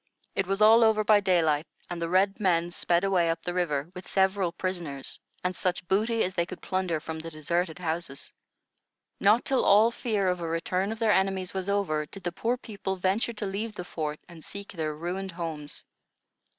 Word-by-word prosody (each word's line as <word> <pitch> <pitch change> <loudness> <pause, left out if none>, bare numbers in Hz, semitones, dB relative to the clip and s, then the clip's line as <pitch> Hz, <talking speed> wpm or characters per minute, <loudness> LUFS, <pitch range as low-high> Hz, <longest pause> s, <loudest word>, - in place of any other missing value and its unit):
It 195 - 0
was 195 +2 +2
all 225 +2 +8
over 220 -1 +4
by 210 0 +6
daylight, 165 -5 +2 0.2
and 175 -1 -5
the 165 - -1
red 195 +4 +3
men 175 -4 +2
sped 175 0 +1
away 185 -4 +3
up 165 0 -2
the 175 - -3
river, 165 -3 -1
with 180 - -9
several 190 -2 +2
prisoners, 170 -8 -4 0.2
and 180 0 -1
such 180 0 -2
booty 220 +4 +2
as 185 - -2
they 170 -1 0
could 185 - -8
plunder 185 -4 -1
from 160 0 -6
the 165 +1 -6
deserted 165 +2 -1
houses. 165 -5 -4 0.9
Not 210 +4 +4
till 270 - +2
all 215 +3 +6
fear 215 -5 -1
of 180 -1 +1
a 170 - -3
return 180 +4 -1
of 225 - -4
their 220 -1 +3
enemies 190 -1 0
was 190 0 -3
over, 155 -7 0
did 195 +3 -12
the 175 - -1
poor 230 +7 -1
people 200 -5 -4
venture 190 +6 0
to 210 -1 -4
leave 210 +3 -3
the 180 - -6
fort 150 -3 -4
and 170 -3 -13
seek 200 0 -7
their 155 -4 -3
ruined 180 +4 -4
homes. 160 -4 -5
185 Hz, 200 wpm, -28 LUFS, 170-200 Hz, 0.9 s, all